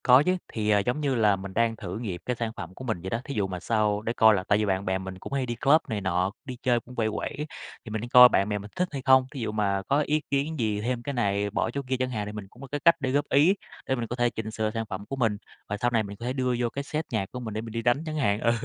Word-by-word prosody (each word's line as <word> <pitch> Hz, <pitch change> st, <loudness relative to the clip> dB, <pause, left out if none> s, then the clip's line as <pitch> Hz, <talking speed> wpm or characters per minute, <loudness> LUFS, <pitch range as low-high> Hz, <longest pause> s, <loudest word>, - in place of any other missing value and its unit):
Có 125 Hz, +3 st, +7 dB
chứ, 185 Hz, +3 st, +2 dB, 0.2 s
thì, 105 Hz, -2 st, -1 dB
à, 105 Hz, -1 st, +5 dB
giống 125 Hz, +9 st, -1 dB
như 140 Hz, -3 st, +1 dB
là 105 Hz, -4 st, +4 dB
mình 95 Hz, 0 st, -8 dB
đang 115 Hz, +1 st, +2 dB
thử 100 Hz, -3 st, -6 dB
nghiệm 95 Hz, -7 st, -4 dB
cái 125 Hz, -, -1 dB
sản 115 Hz, -1 st, -3 dB
phẩm 85 Hz, +1 st, -7 dB
của -, -, -9 dB
mình 110 Hz, -8 st, -2 dB
vậy 95 Hz, -, -5 dB
đó, 115 Hz, +4 st, -2 dB
thí 140 Hz, -, -5 dB
dụ 100 Hz, -2 st, +1 dB
mà 90 Hz, -1 st, -5 dB
sau 105 Hz, +1 st, +1 dB
để 115 Hz, +2 st, -2 dB
coi 110 Hz, -2 st, +6 dB
là, 95 Hz, -, -1 dB
tại 100 Hz, -, +4 dB
vì 105 Hz, -, +1 dB
bạn 95 Hz, 0 st, 0 dB
bè 95 Hz, 0 st, +1 dB
mình 95 Hz, 0 st, -7 dB
cũng 140 Hz, -, -8 dB
hay 135 Hz, -2 st, 0 dB
đi 120 Hz, -1 st, -3 dB
club 145 Hz, +6 st, +4 dB
này 105 Hz, -2 st, -2 dB
nọ, 95 Hz, 0 st, 0 dB
đi 130 Hz, -2 st, -6 dB
chơi 120 Hz, -2 st, +2 dB
cũng 125 Hz, +2 st, -14 dB
quẩy, 110 Hz, -2 st, +1 dB
quẩy, 145 Hz, +7 st, -4 dB, 0.4 s
thì -, -, -7 dB
mình 110 Hz, 0 st, -2 dB
đi 120 Hz, -, -5 dB
coi 125 Hz, 0 st, +9 dB
bạn 100 Hz, -2 st, +2 dB
bè 105 Hz, -, 0 dB
mình 105 Hz, +1 st, -9 dB
thích 180 Hz, -, +1 dB
hay 140 Hz, -2 st, -4 dB
không? 130 Hz, -1 st, +6 dB
Thí 140 Hz, -, -7 dB
dụ 110 Hz, -2 st, -2 dB
mà 100 Hz, -2 st, 0 dB
có 145 Hz, +2 st, +3 dB
ý 150 Hz, +1 st, +2 dB
kiến 145 Hz, +2 st, 0 dB
gì, 105 Hz, -3 st, 0 dB
thêm 120 Hz, +1 st, -2 dB
cái 140 Hz, -, -3 dB
này, 100 Hz, -4 st, 0 dB
bỏ 110 Hz, +2 st, -1 dB
chỗ 140 Hz, -, -3 dB
kia 130 Hz, -, +1 dB
chẳng 130 Hz, 0 st, 0 dB
hạn 110 Hz, -4 st, -3 dB
thì 105 Hz, -, -5 dB
mình 105 Hz, -2 st, -7 dB
cũng 120 Hz, -, -17 dB
có 135 Hz, -, -8 dB
cái 145 Hz, -, -1 dB
cách 170 Hz, 0 st, +8 dB
để 130 Hz, -3 st, -1 dB
góp 145 Hz, +2 st, +2 dB
ý, 155 Hz, +8 st, +5 dB, 0.3 s
để 130 Hz, -, +1 dB
mình 120 Hz, -2 st, -3 dB
có 120 Hz, -, -4 dB
thể 120 Hz, -1 st, +2 dB
chỉnh 110 Hz, -1 st, -5 dB
sửa 110 Hz, 0 st, -1 dB
sản 115 Hz, 0 st, -3 dB
phẩm 100 Hz, +2 st, -5 dB
của 135 Hz, -, -5 dB
mình 115 Hz, -5 st, +1 dB, 0.3 s
và 105 Hz, -, -2 dB
sau 120 Hz, +4 st, 0 dB
này 115 Hz, -2 st, +2 dB
mình 100 Hz, 0 st, -8 dB
có 115 Hz, -, -7 dB
thể 125 Hz, -, -1 dB
đưa 130 Hz, -2 st, 0 dB
vô 120 Hz, -1 st, +1 dB
cái 140 Hz, +4 st, -4 dB
set 155 Hz, +2 st, -3 dB
nhạc 105 Hz, -3 st, -2 dB
của 125 Hz, -, -5 dB
mình 110 Hz, -4 st, -5 dB
để 110 Hz, -, -2 dB
mình 115 Hz, 0 st, -8 dB
đi 115 Hz, +1 st, -2 dB
đánh 120 Hz, +6 st, +2 dB
chẳng 155 Hz, -1 st, -4 dB
hạn, 105 Hz, -8 st, +1 dB
ừ, 115 Hz, -, +3 dB
115 Hz, 340 wpm, -27 LUFS, 105-130 Hz, 0.4 s, coi